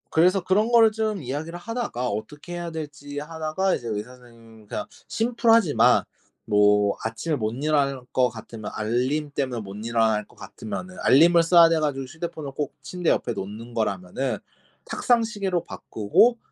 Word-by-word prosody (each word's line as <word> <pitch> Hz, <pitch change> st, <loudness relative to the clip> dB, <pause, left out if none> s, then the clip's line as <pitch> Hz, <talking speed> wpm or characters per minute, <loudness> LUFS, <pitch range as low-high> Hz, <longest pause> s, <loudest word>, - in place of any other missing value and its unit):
그래서 180 Hz, +3 st, +3 dB
그런 210 Hz, +6 st, +2 dB
거를 225 Hz, -2 st, +6 dB
좀 215 Hz, -3 st, -2 dB
이야기를 150 Hz, +6 st, -5 dB
하다가 215 Hz, -, -3 dB
어떻게 130 Hz, -, -6 dB
해야 175 Hz, -1 st, -4 dB
될지 145 Hz, -2 st, -6 dB
하다가 160 Hz, +5 st, -1 dB
이제 120 Hz, -, -7 dB
의사 110 Hz, +3 st, -4 dB
선생님이 115 Hz, -3 st, -17 dB
그냥 -, -, -4 dB, 0.2 s
심플하지만 230 Hz, -6 st, +3 dB, 0.4 s
뭐 105 Hz, -1 st, +3 dB
아침에 115 Hz, +8 st, -2 dB
못 110 Hz, -5 st, -1 dB
일어날 140 Hz, -1 st, 0 dB
것 125 Hz, -1 st, +3 dB
같으면 110 Hz, -1 st, -8 dB
알림 125 Hz, +7 st, -1 dB
때문에 130 Hz, -5 st, -2 dB
못 100 Hz, -1 st, -9 dB
일어날 110 Hz, -2 st, +1 dB
것 -, -, -23 dB
같으면은 185 Hz, +12 st, -7 dB
알림을 170 Hz, +5 st, +6 dB
써야 170 Hz, 0 st, +7 dB
돼 165 Hz, -1 st, +2 dB
가지고 145 Hz, -3 st, -1 dB
휴대폰을 155 Hz, +1 st, -6 dB
꼭 145 Hz, +1 st, -4 dB
침대 180 Hz, -2 st, -2 dB
옆에 120 Hz, -, +1 dB
놓는 110 Hz, +4 st, -7 dB
거라면은 110 Hz, +3 st, -2 dB, 0.5 s
탁상 240 Hz, -2 st, +2 dB
시계로 200 Hz, -6 st, -2 dB
바꾸고 115 Hz, -, +2 dB
145 Hz, 355 characters per minute, -24 LUFS, 115-175 Hz, 0.5 s, 써야